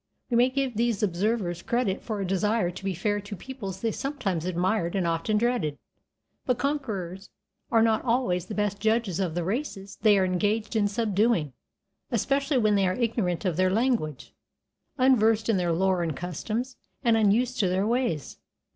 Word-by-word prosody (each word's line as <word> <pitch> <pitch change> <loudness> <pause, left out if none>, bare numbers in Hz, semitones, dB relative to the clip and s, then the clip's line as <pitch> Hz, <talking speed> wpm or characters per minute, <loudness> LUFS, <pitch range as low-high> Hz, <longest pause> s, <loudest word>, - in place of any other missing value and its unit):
We - - +2
may 245 +2 +5
give 265 -2 -1
these 230 -3 +1
observers 185 -2 0
credit 235 -4 -1
for 215 -3 -4
a 195 - -1
desire 195 +1 +1
to 180 - -10
be 190 -2 -2
fair 205 +4 0
to 205 +1 -7
peoples 200 -5 -7
they 225 - 0
sometimes 215 - -3
admired 180 +1 0
and 190 -3 +1
often 170 +6 0
dreaded, 230 -11 0 0.7
but 250 -2 0
conquerors 210 - -3 0.4
are 225 -4 +4
not 225 -1 +2
always 230 -8 0
the 210 - -5
best 205 -1 -1
judges 220 -4 +1
of 175 -4 -1
the 175 - -1
races 200 - -4
they 210 -2 +5
are 190 - +3
engaged 210 +4 0
in 210 -2 +3
subduing, 205 - +1 0.6
especially 275 0 +1
when 215 -3 +3
they 195 -2 +3
are 185 - 0
ignorant 215 -7 -1
of 175 -4 0
their 185 0 +3
language, 190 - -1 0.6
unversed 225 -4 +3
in 220 - +3
their 175 -2 0
lore 185 +1 +2
and 160 -5 -2
customs, 215 - -4 0.3
and 230 -3 +4
unused 225 +4 +2
to 195 -5 +2
their 190 +2 +1
ways. 230 - -1
210 Hz, 175 wpm, -27 LUFS, 185-235 Hz, 0.7 s, may